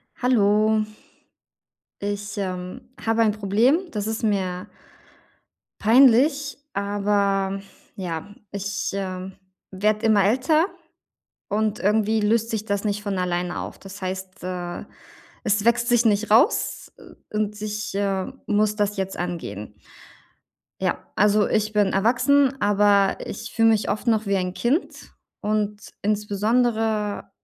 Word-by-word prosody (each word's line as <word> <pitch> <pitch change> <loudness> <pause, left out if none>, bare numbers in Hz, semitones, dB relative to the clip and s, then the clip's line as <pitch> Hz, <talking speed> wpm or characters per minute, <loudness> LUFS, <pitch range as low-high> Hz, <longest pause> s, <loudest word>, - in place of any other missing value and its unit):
Hallo. 215 -3 +3 1.2
Ich, 205 0 -3
ähm, 185 -2 -4 0.2
habe 225 0 +2
ein 220 -2 +4
Problem. 215 +7 +2
Das 210 -1 -3
ist 220 +1 -3
mir 185 -4 -1 1.2
peinlich, 275 +5 +4 0.2
aber 200 -1 0 0.4
ja. 180 +1 -5 0.2
Ich, 200 0 -3
ähm, 190 -1 -4 0.4
werde 210 +3 +1
immer 210 -3 +4
älter 265 - +3 0.8
und 215 0 0
irgendwie 215 +2 +2
löst 225 +2 +1
sich 220 -2 -2
das 200 -1 -2
nicht 205 0 -1
von 200 -2 -2
alleine 180 0 -1
auf. - - -7
Das 195 +1 -11
heißt, 185 0 -6
äh, 180 -1 -5 0.6
es 210 -1 +1
wächst 235 0 +3
sich 240 -1 +4
nicht 210 0 +2
raus, 230 - +3
äh, - - -12
und 210 0 -2
ich, 210 -1 -4
äh, 195 +3 -1
muss 210 0 +1
das 205 0 0
jetzt 190 0 -3
angehen. 160 - -5 1.1
Ja, - - +1 0.2
also 210 0 +3
ich 215 0 0
bin 205 -2 +2
erwachsen, 265 +6 +3
aber 205 -2 +3
ich - - -7
fühle 225 0 +4
mich 220 -2 +2
oft 210 +4 -4
noch 220 -1 +2
wie 200 0 +1
ein 180 -1 -2
Kind 270 +9 -1 0.3
und 210 -1 -1 0.2
insbesondere, 215 +1 0
210 Hz, 125 wpm, -23 LUFS, 195-220 Hz, 1.2 s, ein